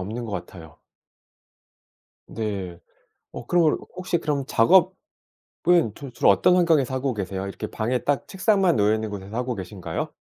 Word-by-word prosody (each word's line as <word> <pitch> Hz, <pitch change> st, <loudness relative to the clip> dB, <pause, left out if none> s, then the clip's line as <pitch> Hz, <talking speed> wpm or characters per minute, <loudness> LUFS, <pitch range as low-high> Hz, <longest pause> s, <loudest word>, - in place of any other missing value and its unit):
없는 110 Hz, +6 st, -5 dB
것 110 Hz, -, -6 dB
같아요. 80 Hz, -6 st, -8 dB, 1.5 s
네. 100 Hz, -6 st, -5 dB, 0.5 s
어 -, -, -8 dB
그러면 170 Hz, -3 st, +3 dB, 0.2 s
혹시 180 Hz, -1 st, -1 dB
그럼 145 Hz, -4 st, -2 dB
작업은 185 Hz, -, +3 dB, 0.8 s
주로 140 Hz, -3 st, -9 dB
주로 120 Hz, -, +2 dB
어떤 100 Hz, -, +4 dB
환경에서 160 Hz, -8 st, +2 dB
하고 130 Hz, -1 st, -1 dB
계세요? 95 Hz, -1 st, -4 dB
이렇게 100 Hz, -, -6 dB
방에 120 Hz, +4 st, -2 dB
딱 140 Hz, -1 st, -1 dB
책상만 190 Hz, -2 st, +2 dB
놓여 105 Hz, +1 st, +3 dB
있는 110 Hz, 0 st, -4 dB
곳에서 100 Hz, +1 st, -8 dB
하고 125 Hz, 0 st, -2 dB
계신가요? 90 Hz, -3 st, -5 dB
120 Hz, 325 characters per minute, -24 LUFS, 100-155 Hz, 1.5 s, 어떤